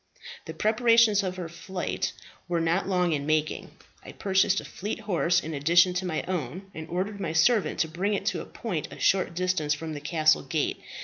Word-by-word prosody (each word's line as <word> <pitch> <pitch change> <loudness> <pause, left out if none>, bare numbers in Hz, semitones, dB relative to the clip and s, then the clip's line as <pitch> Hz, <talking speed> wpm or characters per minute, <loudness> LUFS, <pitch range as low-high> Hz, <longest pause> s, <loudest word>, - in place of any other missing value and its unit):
"The 160 - -7
preparations 225 +1 +4
for 190 - -1
her 180 -2 -6
flight 180 +2 -4 0.4
were 175 -1 0
not 165 +4 +1
long 180 -3 +2
in 145 -1 -2
making. 155 0 0 0.3
I - - -10
purchased 195 -1 +2
a - - -9
fleet 210 +3 -5
horse 175 -4 +2
in 160 -3 -6
addition 170 +5 +4
to 180 +1 -2
my 160 -3 -2
own, 180 +2 -4
and 160 0 -8
ordered 195 +4 -3
my 170 -5 -3
servant 210 +6 +3
to 160 - +1
bring 190 +6 -1
it 195 - -4
to - - -4
a - - -8
point 180 -10 -4
a - - -9
short 185 -3 +2
distance 180 -5 0
from 160 0 -6
the 145 - -6
castle 155 0 +3
gate. 155 -3 -2
180 Hz, 200 wpm, -27 LUFS, 160-195 Hz, 0.4 s, preparations